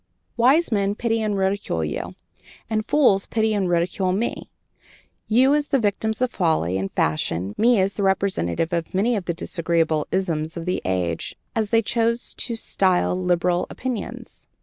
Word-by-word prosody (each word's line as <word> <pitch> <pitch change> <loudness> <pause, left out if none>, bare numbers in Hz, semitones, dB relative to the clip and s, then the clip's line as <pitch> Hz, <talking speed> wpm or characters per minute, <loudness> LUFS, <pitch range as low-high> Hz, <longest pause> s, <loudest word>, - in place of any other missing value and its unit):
Wise 265 +8 +4
men 200 -1 +1
pity 225 0 0
and 210 -2 -1
ridicule 190 - -1
you, 75 - -5 0.5
and 215 -1 -2
fools 245 -10 +3
pity 220 -1 +1
and 195 -3 0
ridicule 175 +2 +1
me 210 +6 -2 0.8
you 255 +5 +4
as 295 -1 +1
the 275 - +2
victims 220 +1 0
of 250 - 0
folly 160 - +1
and 95 0 -3
fashion, 85 +5 -1
me 235 -1 +4
as 190 +1 +1
the - - -4
representative 190 - 0
of 170 +1 -2
many 225 +5 +2
of 195 -4 -3
the 170 - -2
disagreeable 165 -3 0
'isms' 165 -4 -1
of 165 - -5
the 180 - -1
age, 90 -3 -2 0.2
as 220 -2 0
they 225 +1 +3
choose 230 +2 0
to 235 - -4
style 185 -5 +1
liberal 180 -1 +1
opinions. 255 -4 -6
195 Hz, 165 wpm, -23 LUFS, 170-225 Hz, 0.8 s, Wise